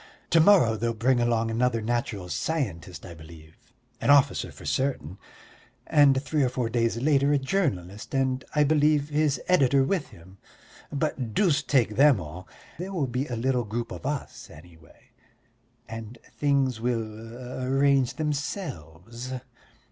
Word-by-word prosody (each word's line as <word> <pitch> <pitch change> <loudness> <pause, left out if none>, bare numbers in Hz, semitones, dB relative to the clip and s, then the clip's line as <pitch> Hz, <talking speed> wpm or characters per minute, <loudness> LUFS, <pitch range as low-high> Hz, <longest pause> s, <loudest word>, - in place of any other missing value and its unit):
To 165 - +5
morrow 160 - +5
they'll 115 +1 -1
bring 125 +3 +2
along 115 -1 +1
another 120 0 +1
natural 115 -4 -2
scientist, 90 - -3
I 85 - -9
believe, 80 0 -14 0.5
an - - 0
officer 140 -2 +4
for - - -13
certain, 115 - -2 0.7
and 140 -3 +4
three 150 0 0
or 130 - +2
four 125 -2 -2
days 115 -1 +1
later 140 +2 +2
a - - +4
journalist, 130 - -2
and, 130 -1 0
I 150 - +5
believe, 150 0 +2
his 150 -3 +1
editor 140 -6 +4
with 150 0 -1
him. 95 -3 -17 0.5
But 135 -6 -2
deuce 165 -9 +3
take 120 -6 +1
them 140 -5 +6
all, 90 +3 -9 0.3
there 185 +2 -5
will 160 -7 0
be 130 +3 -3
a 120 - -4
little 125 +1 0
group 115 +3 -4
of - - -6
us 145 -2 -5
anyway, 80 0 -17 0.8
and 115 +1 -8 0.2
things 135 -5 +1
will 115 +2 -4
arrange 135 0 +2
themselves. 130 - -5
125 Hz, 145 wpm, -26 LUFS, 110-140 Hz, 0.8 s, them